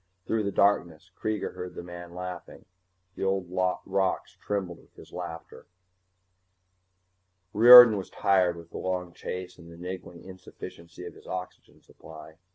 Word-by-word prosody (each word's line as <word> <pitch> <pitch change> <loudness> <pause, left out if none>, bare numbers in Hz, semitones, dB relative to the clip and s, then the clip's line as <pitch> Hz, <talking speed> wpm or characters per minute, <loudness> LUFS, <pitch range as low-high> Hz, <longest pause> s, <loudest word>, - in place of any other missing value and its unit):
Through 110 -2 -1
the 100 - -1
darkness 90 -4 +1
Kreega 110 -1 -3
heard 90 -1 -8
the - - -7
man 85 0 -10
laughing. 90 -1 -8 0.5
The - - -6
old 95 -1 0 0.4
rocks 95 0 -1
trembled 95 -5 -4
with - - -24
his - - -15
laughter. 85 -2 -8 1.9
Riordan 120 0 +10
was 95 - -6
tired 90 -3 +1
with 85 0 -13
the - - -7
long 90 -2 -3
chase 90 +1 -7
and 85 0 -14
the 85 - -13
niggling 90 -1 -8
insufficiency 85 -2 -11
of - - -8
his - - -17
oxygen 90 0 -8
supply. 80 0 -14
90 Hz, 145 wpm, -27 LUFS, 85-95 Hz, 1.9 s, Riordan